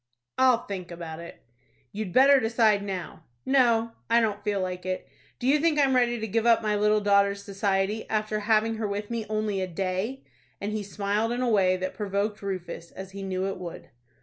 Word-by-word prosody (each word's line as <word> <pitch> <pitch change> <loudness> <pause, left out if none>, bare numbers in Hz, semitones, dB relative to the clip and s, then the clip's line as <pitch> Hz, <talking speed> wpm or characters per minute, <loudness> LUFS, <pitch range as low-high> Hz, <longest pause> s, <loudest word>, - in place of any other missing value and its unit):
"I'll 255 -2 +4
think 185 -3 -6
about 165 -2 -7
it." 170 - -11 0.5
"You'd 205 -2 -4
better 275 +5 +6
decide 225 -3 +3
now." 185 -5 -6 0.2
"No, 235 -4 +3 0.2
I 230 +1 +5
don't 210 -3 -1
feel 205 -1 0
like 180 -1 -3
it. 185 0 -3 0.3
Do 245 - -6
you 285 +3 +4
think 320 0 +2
I'm 275 -2 +3
ready 240 -1 +2
to 220 - -3
give 225 +3 0
up 230 -1 +5
my 210 -1 +1
little 210 +1 +3
daughter's 200 0 +3
society, 200 +1 -1
after 215 0 -1
having 220 +1 +2
her 220 -1 -2
with 205 +2 -4
me 230 -2 -3
only 215 -2 -1
a 185 - -1
day?" 190 +9 -3 0.4
and 205 +1 -3
he 215 - -2
smiled 205 +3 -1
in 245 +1 -1
a 245 - +1
way 185 -4 +3
that 185 0 -3
provoked 205 +1 -2
Rufus, 185 -3 -5
as 190 0 -9
he 200 0 -8
knew 190 -1 -2
it 195 - -3
would. 175 -2 -8
210 Hz, 200 wpm, -27 LUFS, 195-225 Hz, 0.5 s, better